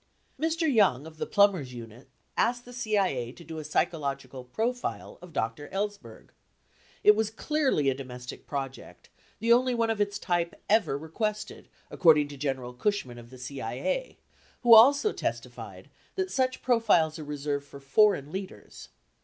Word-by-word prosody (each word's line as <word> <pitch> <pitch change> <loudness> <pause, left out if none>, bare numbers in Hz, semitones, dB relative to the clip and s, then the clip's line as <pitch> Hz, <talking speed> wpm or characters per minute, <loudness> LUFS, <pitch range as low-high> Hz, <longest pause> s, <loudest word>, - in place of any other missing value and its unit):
32 325 +1 0
Mr. 295 - +2
Young 185 - +3
of 160 -1 -12
the - - -3
Plumbers 185 -11 +2
unit 115 +1 -11 0.3
asked 245 +1 +1
the 245 - -11
CIA 195 - 0
to 170 - -13
do 160 0 -7
a - - -4
psychologi 140 -4 -2
cal 130 -2 -8
profile 230 - -3
of 180 -1 -12
Dr. 125 +1 -3
Ellsberg. 200 - -5 0.7
It 210 - +7
was 220 0 0
clearly 265 - 0
a 135 - +3
domestic 125 -2 -9
project! 135 -2 -6 0.3
the 230 +2 +4
only 250 +1 +3
one 230 -1 +1
of 215 -2 -1
its 200 -1 0
type 175 -3 -1
ever 205 -10 +2
requested, 210 +8 -4 0.2
according 150 -4 +5
to 145 - -8
General 130 -3 -3
Cush 205 +10 0
rni - - -13
i - - -9
n 120 - -11
of 120 0 -13
the 130 - -12
CIA, 130 - -4 0.5
who 240 -1 +8
also 280 - +7
testified - - -6 0.2
that 380 -1 -2
such 255 -1 0
profiles 210 -10 +3
are - - -6
reserved 145 -1 -3
fob 140 -1 -12
foreign 150 -1 +3
leaders. 185 - -8
165 Hz, 170 wpm, -28 LUFS, 135-220 Hz, 0.7 s, who